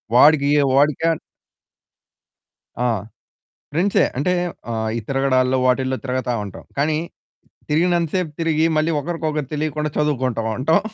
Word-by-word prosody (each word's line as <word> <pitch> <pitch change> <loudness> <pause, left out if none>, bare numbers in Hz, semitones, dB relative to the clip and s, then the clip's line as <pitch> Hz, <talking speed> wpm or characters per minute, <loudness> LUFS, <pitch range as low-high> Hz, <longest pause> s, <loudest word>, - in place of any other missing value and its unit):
వాడికియ 145 +1 +6
వాడికన్ 150 +3 +2 1.7
ఆ! - - +3 0.8
ఫ్రెండ్సే. 180 +6 +2
అంటే 150 +7 +1 0.4
ఆహ్, 110 -1 -1
ఈ - - -1
తిరగడాల్లో, 130 -1 +2
వాటిల్లో 130 +1 +1
తిరుగుతా 130 -1 -1
ఉంటాం. 100 - -10
కానీ 150 +2 +1 0.7
తిరిగినంత 170 +1 +2
సేపు 180 -4 -1
తిరిగి, 160 -1 +2
మళ్ళీ 155 +2 +2
ఒకరికొకరు 155 -3 -3
తెలియకుండా 150 0 -1
చదువుకుంటా 130 -6 0 0.2
ఉంటాం. 150 +6 +3
150 Hz, 110 wpm, -21 LUFS, 130-160 Hz, 1.7 s, వాడికియ